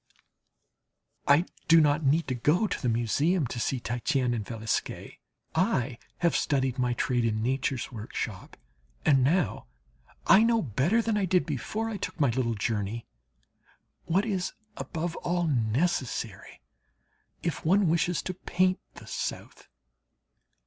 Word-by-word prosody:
I 145 +5 +5 0.2
do 165 0 +7
not 150 0 +3
need 150 +4 +2
to - - 0
go 150 - +2
to - - -3
the 125 - +1
Museum 140 - +1
and 125 - -3
to 120 - -4
see 130 +2 -1
Titian 125 +1 0
and 115 -3 -2
Velasquez. 110 0 -3 0.4
I 125 -1 0 0.2
have 170 -1 +1
studied 130 -3 0
my 125 -1 +1
trade 120 0 0
in 110 -1 0
Nature's 130 +1 -1
workshop, 110 -2 -6 0.5
and 135 -3 +5
now 160 - +1 0.6
I 195 - +7
know 230 0 +3
better 155 - +1
than 225 -2 0
I 200 - +1
did 180 0 +2
before 190 - -3
I 225 -2 -3
took 175 - -5
my 140 -5 +3
little 115 -1 0
journey, 110 +1 -2 1.0
what 190 +5 +2
is 190 -5 -2 0.2
above 170 0 -4
all 175 0 -1
necessary 125 - -1 0.8
if 165 -6 -2
one 190 +4 +4
wishes 170 +1 +1
to 185 - -3
paint 185 +1 +1 0.2
the - - -11
South. - - -5
145 Hz, 140 wpm, -28 LUFS, 120-175 Hz, 1.0 s, do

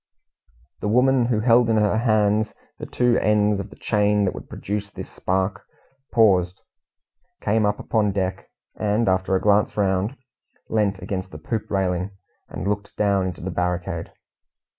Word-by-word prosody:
The - - -3
woman 125 +3 +3
who 115 -3 +1
held 120 0 +4
in 110 - +3
her 105 0 +2
hands 110 -2 +2 0.2
the - - -6
two 125 -1 +2
ends 105 -1 +2
of 100 +1 -6
the - - -14
chain 105 -1 +1
that 95 - 0
would - - -10
produce 100 0 -4
this - - -9
spark, 95 +2 -1 0.5
paused, 95 -5 +3 0.8
came 105 0 +1
up 105 - 0
upon 105 -3 0
deck, 95 -1 -3 0.3
and, 105 +1 0
after 95 0 +1
a - - +2
glance 105 +1 +2
round, 100 +5 0 0.5
leant 105 -3 +1
against 95 -1 -4
the - - -9
poop 110 -3 -4
railing, 95 -1 0 0.4
and 95 - -5
looked 100 0 -3
down 100 -2 +2
into 90 - -6
the 95 +3 -4
barricade. 90 -1 -2
105 Hz, 160 wpm, -23 LUFS, 95-110 Hz, 0.8 s, held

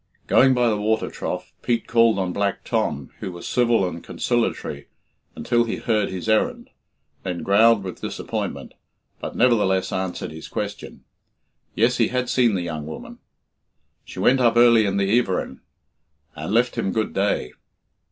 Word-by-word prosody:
Going 130 0 +5
by 120 -1 +2
the 105 -2 0
water 110 +1 0
trough, - - -5
Pete 115 -1 0
called 115 -2 +3
on 95 -2 -1
Black 100 +1 -1
Tom, 75 - -2
who 95 - -5
was 85 -1 -9
civil 120 -6 +2
and 85 -1 -7
conciliatory 120 -1 -2 0.5
until 120 0 +1
he 115 - -2
heard 110 -3 0
his 95 +2 -6
errand, 110 -1 0 0.5
then 90 -2 -4
growled 110 +1 +4
with 90 -2 -7
disappointment, - - -5 0.5
but - - -6
nevertheless 105 -6 +2
answered 95 -3 -3
his 80 0 -9
question. - - -6 0.7
Yes, 120 +3 +2
he 115 - +3
had 125 0 -2
seen 120 -5 +3
the 90 - -2
young 80 -3 -5
woman. 80 - -9 0.8
She - - -12
went 135 +1 +3
up 120 -1 +3
early 115 -3 +6
in 100 0 -1
the 100 +4 +3
"everin," 95 -7 -3 0.7
and - - -5
left 120 +3 +1
him 95 - -1
good 110 -1 -1
day. 100 -10 0
110 Hz, 160 wpm, -23 LUFS, 95-120 Hz, 0.8 s, early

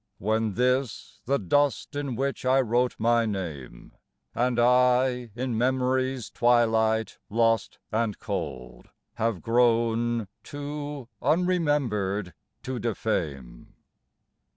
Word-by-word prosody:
When 110 +1 0
this, 125 0 -1
the 140 +3 +2
dust 145 - 0
in 140 -4 -3
which 135 +3 -2
I 130 +1 +3
wrote 125 0 +1
my 115 +1 +2
name, 80 - -6 0.4
And 120 0 0
I 125 0 +3
in 125 -1 -2
memory's 130 0 0
twilight 110 -2 +2
lost 115 -1 +1
and 110 -1 0
cold 65 - -6 0.3
Have 110 -5 -1
grown 115 -1 +2 0.2
too 145 -2 -6
unremembered 140 - 0 0.3
to 130 -1 -4
defame 75 - -3
120 Hz, 100 wpm, -26 LUFS, 110-130 Hz, 0.4 s, I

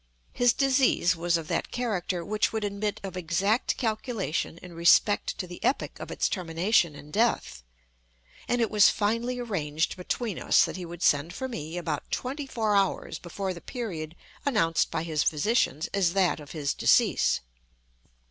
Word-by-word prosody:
His 245 -1 +4
disease 260 -9 +3
was 170 +1 +1
of 160 -2 -6
that - - -1
character 190 -7 -2
which 215 +3 0
would 220 -1 -2
admit 205 0 -2
of 190 -1 -6
exact 185 +6 0
calculation 220 - -2
in 180 0 -11
respect 170 +5 +3
to 190 - -3
the 175 0 -10
epoch 275 - 0
of - - -7
its - - 0
termination 170 -1 +1
in 145 +1 -12
death; 215 - 0 0.9
and 245 0 +1
it 230 - +1
was 210 -2 +6
finally 230 +4 0
arranged 165 -10 -2
between 200 +3 -3
us - - +4
that - - -6
he 180 -2 -6
would 170 0 -7
send 150 +5 +2
for 260 - -3
me 165 - -6
about 160 -4 -3
twenty 275 +3 -3
four 220 -5 0
hours 195 -1 0
before 185 +2 -4
the 170 - -10
period 170 - -5 0.3
announced 165 -12 +2
by 160 - -2
his 155 -3 -1
physicians 160 - +1
as 185 -4 +2
that 190 -4 +2
of 145 -2 -11
his 145 -4 -2
decease. - - +3
185 Hz, 165 wpm, -27 LUFS, 165-225 Hz, 0.9 s, was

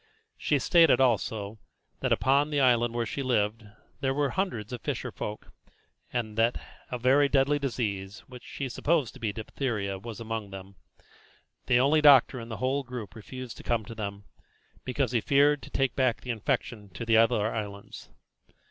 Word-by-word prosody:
She - - +1
stated, 165 -7 +5
also, 110 -4 0 0.4
that - - -1
upon 140 +3 +3
the 145 -1 0
island 120 -3 +3
where 120 -1 0
she 140 - -4
lived 110 -4 0 0.3
there 135 0 0
were 145 -1 +1
some - - -7
hundreds 125 - -2
of 120 - -5
fisher - - -3
folk, 105 0 -7 0.6
and 110 -3 -3
that 115 +2 +2 0.3
a 125 - -3
very 135 +4 +4
deadly 140 +1 +2
disease, 105 -7 -3
that 125 -1 -11
she 135 +2 -5
supposed 145 -1 0
to - - -13
be 110 -2 -1
diphtheria, 105 -3 -3
was 115 +2 -8
among 110 -2 -4
them. 95 0 -10 0.9
The 120 - +4
only 145 +4 +4
doctor 135 -3 +6
in 115 0 -8
the 110 - -5
whole 130 +2 0
group 125 -5 -7
refused 125 +2 -9
to - - -11
come 115 -3 0
to 115 - -8
them, 100 -2 -6 0.6
because 130 0 -1
he 120 -3 +1
feared 145 +3 +3
to - - -11
take 135 -2 0
back 130 -4 +1
the 125 - -4
infection 110 -1 -2
to 115 - -5
the 115 -1 +4
other 115 -1 +3
islands. 100 -2 -7
120 Hz, 180 wpm, -28 LUFS, 110-135 Hz, 0.9 s, doctor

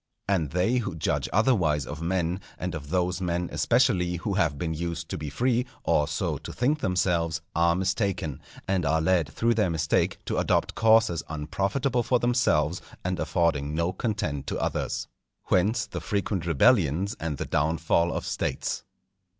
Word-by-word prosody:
And 90 -7 +1
they 90 - +1
who 105 -7 -2
judge 80 - -1
otherwise 90 - +2
of 75 +3 -7
men, 90 +1 0 0.2
and 90 -1 -4
of 75 -3 -6
those 90 +1 0
men, 90 -1 -1
especially, 90 -1 +2
who 100 +4 -3
have 85 -7 +1
been 80 +1 -2
used 85 +1 -4
to - - -3
be 75 -1 -4
free, 125 - +1 0.2
or 75 - +2
so 75 - -2
to - - -8
think 145 +6 +1
themselves, 85 - +1 0.2
are 85 +1 +3
mistaken; 95 - -1 0.3
and 95 -2 +1
are 80 +2 +2
led 85 -2 +2
through 115 +9 +1
their 105 -4 +1
mistake 80 -2 +1
to - - -1
adopt - - +1
courses 110 -7 +4
unprofitable 100 - -1
for 125 +2 +2
themselves 120 -10 +1 0.2
and 90 0 -1
affording 75 -4 0
no 85 +3 0
content 100 - -2
to - - -2
others. - - -2 0.4
Whence, 105 +6 +2
the - - -6
frequent 100 -4 -2
rebellions 85 - +3
and 80 -3 -3
the - - -3
downfall 80 +3 +1
of - - -3
States. - - -2
90 Hz, 165 wpm, -27 LUFS, 80-100 Hz, 0.4 s, courses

